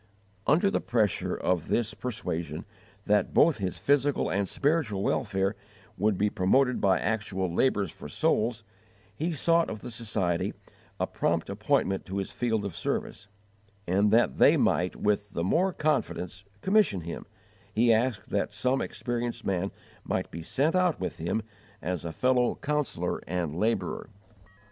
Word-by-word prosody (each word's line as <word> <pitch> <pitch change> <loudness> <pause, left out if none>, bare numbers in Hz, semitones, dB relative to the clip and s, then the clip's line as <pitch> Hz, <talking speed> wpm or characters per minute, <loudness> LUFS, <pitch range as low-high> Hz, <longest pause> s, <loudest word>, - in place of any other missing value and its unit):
Under 175 +8 +4
the - - 0
pressure 110 -5 +1
of 90 -3 0
this 115 -1 0
persuasion 85 -10 -4 0.4
that 105 0 +2
both 155 -6 +5
his 95 -2 -2
physical 145 0 +2
and 100 -1 0
spiritual 140 -10 +1
welfare 95 0 0 0.4
would 100 0 +1
be 105 - +2
promoted 120 +6 +2
by 95 -2 +4
actual 95 -5 -1
labours 100 -4 +2
for - - -10
souls, 110 0 +1 0.5
he 160 +8 -1
sought 165 +2 +2
of 110 - -6
the 125 - -7
Society 95 -6 -1 0.4
a - - +2
prompt 85 +3 -1
appointment 105 -1 +1
to 95 +1 -4
his 95 - -3
field 110 -4 -1
of 95 -5 -5
service; 100 +3 -3 0.6
and 100 +4 +3
that 110 - +3
they - - +7
might - - +2
with 105 0 0
the 85 - -1
more 180 - +2
confidence 100 - -1 0.2
commission 195 - +3
him, 85 +1 -7 0.4
he 115 +1 +4
asked 115 -1 0
that 100 - 0
some 125 +6 0
experienced 120 -1 -3
man 95 0 0 0.3
might - - -2
be 85 - -6
sent 145 - 0
out 180 -3 +2
with 95 - -3
him 85 +7 -1 0.4
as 90 -2 -3
a 85 - -4
fellow 125 +7 +2
counsellor 150 -1 -1
and 85 -3 -2
labourer. 105 -1 -1
105 Hz, 150 wpm, -28 LUFS, 95-130 Hz, 0.6 s, they